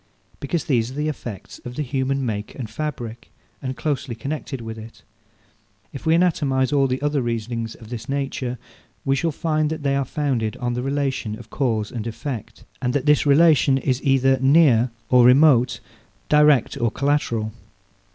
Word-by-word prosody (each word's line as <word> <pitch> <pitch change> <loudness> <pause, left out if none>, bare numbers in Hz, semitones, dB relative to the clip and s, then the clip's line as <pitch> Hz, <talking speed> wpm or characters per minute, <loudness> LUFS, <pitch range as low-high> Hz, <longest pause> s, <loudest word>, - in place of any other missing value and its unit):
because 150 +2 -2
these 120 -5 +1
are 130 - -9
the 150 +1 -1
effects 120 -9 -7
of 125 0 -7
the 150 - -2
human 135 0 -1
make 105 -2 -4
and 115 -5 -6
fabric, 120 -4 -5 0.3
and 130 -2 -4
closely 135 -1 -2
connected 140 +1 -5
with 115 -1 -6
it. 110 +1 -12 0.9
If 135 - -7
we 160 - +5
anatomize 145 -7 +1
all 140 -1 +3
the 130 0 -1
other 145 -1 +1
reasonings 115 -1 -3
of 110 -2 -14
this 115 0 -6
nature, 135 -2 -2 0.5
we 135 0 +2
shall 165 +5 0
find 155 0 0
that 160 -2 -5
they 140 -1 +1
are 140 - +1
founded 130 -6 -2
on 120 0 -2
the 125 - -2
relation 135 -5 -2
of 120 - -13
cause 110 -6 -1
and 115 -2 -4
effect, 120 0 -6 0.2
and 125 0 0
that 145 -1 0
this 150 0 +4
relation 145 -2 +5
is 130 0 -1
either 135 -1 +3
near 135 -4 +5 0.2
or 125 -1 +7
remote, 125 -2 +5 0.5
direct 150 -4 +4
or 120 - +3
collateral. 120 -5 -1
130 Hz, 170 wpm, -22 LUFS, 120-145 Hz, 0.9 s, or